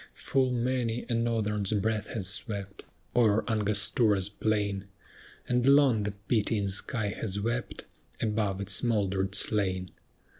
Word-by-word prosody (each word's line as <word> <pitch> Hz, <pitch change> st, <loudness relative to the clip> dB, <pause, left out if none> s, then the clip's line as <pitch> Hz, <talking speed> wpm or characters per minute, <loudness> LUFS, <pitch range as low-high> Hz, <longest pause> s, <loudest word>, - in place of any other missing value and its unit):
Full 130 Hz, -1 st, +1 dB
many 120 Hz, -1 st, -1 dB
a -, -, 0 dB
norther's 110 Hz, -3 st, 0 dB
breath 105 Hz, +1 st, 0 dB
has 110 Hz, -5 st, -4 dB
swept, 100 Hz, -1 st, -4 dB, 0.3 s
O'er 110 Hz, -3 st, +3 dB
Angostura's 105 Hz, -2 st, +2 dB
plain 100 Hz, -2 st, -1 dB, 0.6 s
And 125 Hz, +1 st, +1 dB
long 140 Hz, -5 st, +5 dB
the 105 Hz, -, -2 dB
pitying 105 Hz, -3 st, +1 dB
sky 105 Hz, +2 st, 0 dB
has 100 Hz, 0 st, -3 dB
wept 120 Hz, +4 st, -3 dB, 0.3 s
Above 105 Hz, -3 st, -1 dB
its 100 Hz, -1 st, +2 dB
mouldered 100 Hz, -4 st, 0 dB
slain. 95 Hz, -4 st, 0 dB
105 Hz, 120 wpm, -29 LUFS, 100-115 Hz, 0.6 s, long